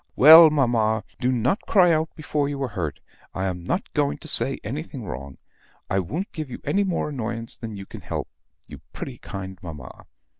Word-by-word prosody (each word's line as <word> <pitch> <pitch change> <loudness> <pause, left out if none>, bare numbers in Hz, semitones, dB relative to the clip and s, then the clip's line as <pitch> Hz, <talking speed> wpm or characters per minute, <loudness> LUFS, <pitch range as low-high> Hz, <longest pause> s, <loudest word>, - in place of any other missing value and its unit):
"Well, 160 +3 +10
mamma! 115 -7 +1 0.2
Do 125 0 +1
not 125 - +1
cry 180 -4 +5
out 160 0 +1
before 150 -2 -1
you 140 -1 -4
are 130 - -2
hurt. 85 -8 -4 0.4
I 95 - -2
am 90 -2 -3
not - - -3
going 70 +1 +1
to - - -9
say - - +2
anything - - -5
wrong. 70 0 -7 0.5
I 95 - +2
won't 155 - -4
give 155 -4 -6
you 125 - -7 0.3
more 180 -5 -1
annoyance 115 -4 -4
than 110 -3 -7
you 95 - -8
can - - -10
help, - - -4 0.4
you - - -11
pretty - - -7
kind 95 -1 -7
mamma. 75 -7 -10
115 Hz, 185 wpm, -24 LUFS, 95-150 Hz, 0.5 s, Well